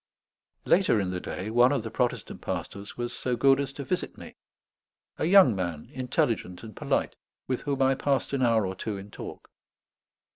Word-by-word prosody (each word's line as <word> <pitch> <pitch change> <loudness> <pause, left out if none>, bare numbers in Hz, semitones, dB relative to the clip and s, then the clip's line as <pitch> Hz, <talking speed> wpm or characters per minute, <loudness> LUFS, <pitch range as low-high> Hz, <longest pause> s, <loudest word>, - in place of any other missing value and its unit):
Later 180 - +4
in 95 -2 -1
the 90 - -2
day 95 +4 -5
one 120 +3 +5
of 140 -6 0
the 110 - -6
Protestant 125 +2 -2
pastors 100 0 -5
was 120 0 -3
so 125 0 -1
good 135 +3 +4
as 140 -1 -2
to 140 - -6
visit 180 +6 -3
me: - - -11 0.8
a - - +1
young 175 - +7
man, 85 -5 -4
intelligent 125 - -1
and 110 -3 -10
polite, - - -1 0.3
with 130 -1 -1
whom 140 -2 0
I 135 0 +4
passed 140 +1 0
an 135 - 0
hour 115 -4 +3
or 95 - -3
two 100 +2 -4
in 100 +1 -10
talk. - - -9
120 Hz, 185 wpm, -27 LUFS, 100-135 Hz, 0.8 s, young